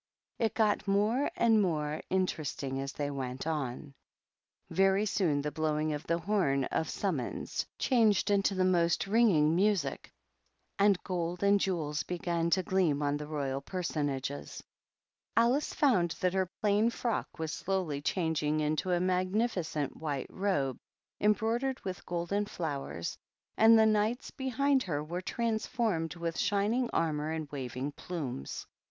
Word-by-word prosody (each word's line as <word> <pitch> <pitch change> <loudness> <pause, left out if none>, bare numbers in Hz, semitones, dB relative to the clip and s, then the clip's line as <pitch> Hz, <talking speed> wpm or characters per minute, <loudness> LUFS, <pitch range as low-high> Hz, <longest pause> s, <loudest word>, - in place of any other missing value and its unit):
It 225 -2 0
got 210 -2 +2
more 210 +7 +2
and 225 -2 +4
more 155 -5 -1
ii 185 0 +3 0.4
ing 135 0 -2
as 135 0 -4
they 145 -1 -2
went 130 -1 -4
on; 145 -3 -3 0.8
Very 195 +2 +3
soon 165 -9 +1
the 150 - -2
blowing 155 0 0
ot 150 +1 -6
i 170 - +3
e - - -1
horn 170 -7 +1
of 160 - -1
summoia - - -2
changed 220 -5 +3
into 200 0 +2
the 185 0 +2
most 175 0 +2
r 205 - -2
ing 165 -9 +4
niueic, 200 0 +1 0.7
and 200 -1 +5
goM 175 -1 -2
and 200 0 +5
jewels 160 -6 -1
began 170 -1 -1
to 185 +2 +2
gleam 175 -6 +2 0.2
he 150 - -4
royal 140 -3 -2
personagoi 145 -5 -3 0.7
Alice 245 +6 +3
found 185 - +2
that 180 0 +1
her 190 -2 0
plai 210 +2 +4
frock 235 -4 -3
was 160 -2 -3
slow^ 175 -8 -2
changing 155 -3 0
into 155 +4 0
a 175 - +3
magnificent 185 - 0
white 145 -4 -4
robe 145 -10 -1 0.4
end 210 0 +4
broidered 240 +4 -1
with 185 -2 -6
golden 175 +4 -1
flowers, 140 - -4 0.4
and 225 +1 +7
the 220 - +6
Knight! 215 +3 +1
behind 270 +1 +1
her 150 -9 -2
were 175 +4 -4
transformed 220 -5 -1
with 170 -1 -3
shining 215 +5 +1
armor 155 -2 0
and 160 -1 -3
waving 135 0 -4
plumes. 140 - -5
180 Hz, 145 wpm, -31 LUFS, 150-205 Hz, 0.8 s, and